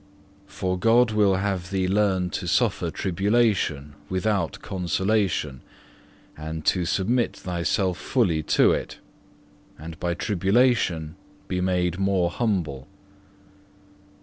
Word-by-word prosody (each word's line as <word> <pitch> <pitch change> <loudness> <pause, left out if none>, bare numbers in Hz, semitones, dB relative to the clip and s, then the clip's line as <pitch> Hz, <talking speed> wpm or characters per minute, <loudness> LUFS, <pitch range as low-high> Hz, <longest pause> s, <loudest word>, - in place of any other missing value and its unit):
For 90 -2 -3
God 115 +3 +4
will 105 -3 +3
have 95 -2 -2
thee 95 -2 0
learn 95 -2 +1
to 90 - -4
suffer 100 -2 +1
tribulation 95 -6 0 0.2
without 95 -4 -1
consolation, 95 - -1 0.7
and 80 0 -6
to 90 -2 +2
submit 115 +7 0
thyself 90 +1 -1
fully 95 -12 +1 0.2
to - - +6
it, - - -3 0.8
and 80 0 -9
by 85 -1 -1
tribulation 95 -5 +1 0.3
be 90 -1 -2
made 90 -1 0
more 95 -3 +1
humble. 85 - -2
95 Hz, 105 wpm, -24 LUFS, 85-105 Hz, 0.8 s, to